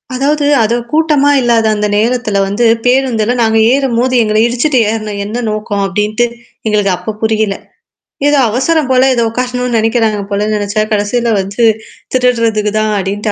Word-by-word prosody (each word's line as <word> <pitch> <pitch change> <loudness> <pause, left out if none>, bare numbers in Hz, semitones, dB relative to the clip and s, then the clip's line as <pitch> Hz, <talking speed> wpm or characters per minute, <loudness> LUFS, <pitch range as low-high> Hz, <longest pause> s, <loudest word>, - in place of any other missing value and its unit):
அதாவது, 290 +2 0 0.2
அத 220 +2 0 0.2
கூட்டமா 300 -2 +2
இல்லாத 235 -2 +2
அந்த 210 0 -1
நேரத்தில 220 -2 0
வந்து, 215 +4 0 0.2
பேருந்துல 245 -3 +1
நாங்க 225 -1 +2
ஏறும்போது, 255 -2 0
"எங்கள 215 0 0
இடிச்சுட்டு 250 +4 0
ஏறுன 215 -2 -4
என்ன 225 +4 -4
நோக்கம்?" 210 -1 -3
அப்படின்ட்டு, 210 +4 0 0.4
எங்களுக்கு 205 -3 +1
அப்ப 220 - -6
புரியல. 220 -2 0 0.7
ஏதோ 290 -1 +3
அவசரம் 275 +5 0
போல, 255 0 +4
ஏதோ 235 - +1
உக்காரணும்னு 250 0 -2
நெனைக்கிறாங்க 225 -1 +1
போலன்னு 210 +2 -1
நெனச்சா, 205 +1 -1
கடைசில 225 +3 0
வந்து, 195 +5 -3 0.5
"திருடுறதுக்கு 230 -4 +1
தான்" 215 0 0
அப்படின்ட்டு 205 +3 -3
225 Hz, 145 wpm, -12 LUFS, 210-250 Hz, 0.7 s, போல